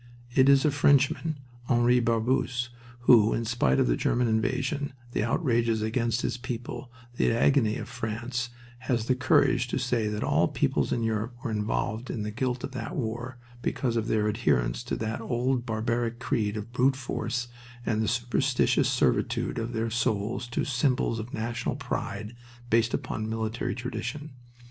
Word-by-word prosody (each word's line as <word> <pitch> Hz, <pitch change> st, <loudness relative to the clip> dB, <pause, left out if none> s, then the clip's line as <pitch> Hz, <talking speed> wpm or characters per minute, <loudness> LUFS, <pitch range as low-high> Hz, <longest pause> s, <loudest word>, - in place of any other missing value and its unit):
It 130 Hz, +1 st, +5 dB
is 140 Hz, 0 st, +6 dB
a 150 Hz, -, +4 dB
Frenchman 145 Hz, +2 st, +3 dB, 0.3 s
Henri 120 Hz, 0 st, +4 dB
Barbusse 120 Hz, +1 st, +1 dB, 0.3 s
who, 115 Hz, -3 st, +6 dB
in 115 Hz, -, -2 dB
spite 110 Hz, -, +2 dB
of -, -, +4 dB
the -, -, +2 dB
German 120 Hz, 0 st, +1 dB
invasion, 135 Hz, +6 st, 0 dB, 0.2 s
the -, -, 0 dB
outrages 115 Hz, -3 st, +1 dB
against 115 Hz, +1 st, 0 dB
his -, -, -1 dB
people, 125 Hz, 0 st, -6 dB, 0.3 s
the -, -, +3 dB
agony 115 Hz, -1 st, +3 dB
of -, -, -6 dB
France, 120 Hz, 0 st, -3 dB, 0.3 s
has 120 Hz, -3 st, -1 dB
the 130 Hz, -, +3 dB
courage 125 Hz, 0 st, +3 dB
to -, -, -2 dB
say 120 Hz, -4 st, 0 dB
that 105 Hz, 0 st, -2 dB
all -, -, +3 dB
peoples -, -, 0 dB
in 120 Hz, -, 0 dB
Europe 115 Hz, +2 st, -1 dB
were 115 Hz, -, -2 dB
involved 110 Hz, +2 st, -2 dB
in 110 Hz, -, -3 dB
the 105 Hz, -, -3 dB
guilt 125 Hz, +2 st, -2 dB
of -, -, -4 dB
that 125 Hz, -3 st, -5 dB
war 120 Hz, +1 st, -3 dB, 0.2 s
because 120 Hz, -2 st, -1 dB
of 115 Hz, -1 st, 0 dB
their 105 Hz, -1 st, +2 dB
adherence 65 Hz, -, +1 dB
to -, -, -2 dB
that 110 Hz, +1 st, -3 dB
old 120 Hz, +2 st, 0 dB
barbaric 115 Hz, +1 st, -1 dB
creed 110 Hz, -4 st, -1 dB
of 105 Hz, +2 st, -6 dB
brute 130 Hz, +2 st, +3 dB
force 125 Hz, -1 st, -3 dB, 0.4 s
and 110 Hz, -2 st, +1 dB
the 110 Hz, -, 0 dB
superstitious 125 Hz, +3 st, +2 dB
servitude -, -, +1 dB
of 115 Hz, +1 st, -3 dB
their 115 Hz, -1 st, -2 dB
souls 115 Hz, 0 st, -1 dB
to 120 Hz, -, -1 dB
symbols 125 Hz, -3 st, +1 dB
of 115 Hz, +3 st, -6 dB
national 115 Hz, +3 st, -2 dB
pride 110 Hz, -5 st, -4 dB, 0.4 s
based 115 Hz, +1 st, +3 dB
upon 110 Hz, 0 st, -3 dB
military 110 Hz, +1 st, -2 dB
tradition. 140 Hz, +5 st, -5 dB
120 Hz, 165 wpm, -28 LUFS, 110-125 Hz, 0.4 s, is